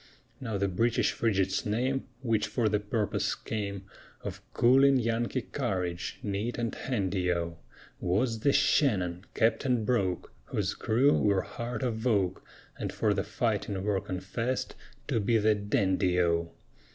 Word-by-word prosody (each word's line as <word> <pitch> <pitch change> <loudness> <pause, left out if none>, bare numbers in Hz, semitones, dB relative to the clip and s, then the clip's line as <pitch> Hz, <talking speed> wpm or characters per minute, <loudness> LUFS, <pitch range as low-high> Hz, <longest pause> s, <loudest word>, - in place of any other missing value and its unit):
Now 115 -6 -3
the 100 0 +1
British 115 +5 +1
Frigate's 100 -4 +1
name 125 +5 0 0.2
Which 110 -3 +1
for 120 -3 0
the 105 0 +2
purpose 105 0 -1
came 100 -3 -4 0.4
Of - - -6
cooling 135 +3 +5
Yankee 120 +1 0
courage 95 -11 -3
Neat 105 +4 -2
and 115 -2 -1
handy 95 -7 -1
O! 85 -1 -2 0.4
Was 110 +6 0
the 140 - +3
Shannon, 95 - +2
Captain 115 0 +2
Broke, 95 -7 0
Whose - - -1
crew 130 +6 +3
were 100 -2 +2
heart 120 +1 -5
of 115 -1 -1
oak, 95 -6 +1 0.4
And - - -2
for - - +1
the - - -1
fighting 95 -2 -1
were 100 -2 +1
confessed 105 +7 -3 0.3
To - - +1
be 110 +3 +2
the 110 0 +4
dandy 95 -3 +1
O! 85 -1 +2
105 Hz, 140 wpm, -29 LUFS, 95-120 Hz, 0.4 s, cooling